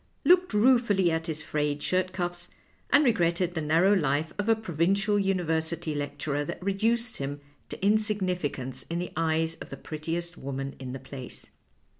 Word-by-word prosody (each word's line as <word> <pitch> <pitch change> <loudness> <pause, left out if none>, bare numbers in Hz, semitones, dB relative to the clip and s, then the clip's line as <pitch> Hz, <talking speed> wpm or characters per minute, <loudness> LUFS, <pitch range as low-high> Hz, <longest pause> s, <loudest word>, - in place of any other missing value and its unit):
looked 360 +1 +5
ruefully 210 -5 +4
at 160 0 -1
his 155 -1 -2
frayed 150 -1 -1
shirt 185 0 +1
cuffs, 175 -1 -3 0.4
and 290 - +5
regretted 175 -6 +2
the 160 - -2
narrow 165 +6 +4
life 155 -3 +1
of 205 +2 0
a 225 - +6
pro 220 -6 -7
vincial 200 +6 +2
university 165 -4 0
lecturer 145 0 -2
that 145 - -6
reduced 225 +4 0
him 140 +1 -4 0.3
to - - -7
in 210 +2 +5
significance 180 -11 -2
in 170 - -2
the 175 +1 -4
eyes 160 0 0
of - - -10
the - - -7
prettiest 165 +3 -4
woman 135 0 -4
in 130 -1 -6
the 135 - -5
place. 130 -1 -9
170 Hz, 170 wpm, -28 LUFS, 150-200 Hz, 0.4 s, a